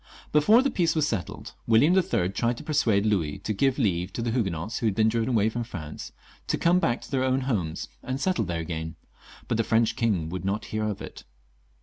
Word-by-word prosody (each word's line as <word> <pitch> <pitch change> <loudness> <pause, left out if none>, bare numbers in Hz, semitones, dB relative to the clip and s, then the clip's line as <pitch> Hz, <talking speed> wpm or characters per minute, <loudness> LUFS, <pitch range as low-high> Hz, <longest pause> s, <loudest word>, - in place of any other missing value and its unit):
Before 210 - +5
the 275 - +1
peace 170 -6 +1
was 155 -2 +2
settled, 100 -9 -4
William 120 +10 +5
IIL 100 - +1
tried 120 +2 0
to - - -8
persuade 115 -10 +2
Louis 90 -9 0
to 110 - -3
give 135 +5 +1
leave 90 -7 0
to 115 - -3
the 115 - -1
Huguenots 105 -3 -2
who 115 - 0
had 100 - 0
been 110 +1 +3
driven 115 +1 0
away 110 -4 +3
from 120 +2 -2
France 80 -10 -8 0.4
to - - 0
come 175 +2 +3
back 120 -8 0
to - - -12
their 130 -2 +1
own 130 0 +1
homes 100 -12 -2
and 130 +1 -4
settle 180 - 0
there 85 -2 -2
again, 80 0 -5 0.5
but 115 - 0
the 115 - +2
French 115 +1 +2
king 100 -9 0
would 90 +2 -5
not 100 +3 -2
hear 110 0 0
of 105 -2 -3
it. - - -10
110 Hz, 225 wpm, -26 LUFS, 95-130 Hz, 0.5 s, Before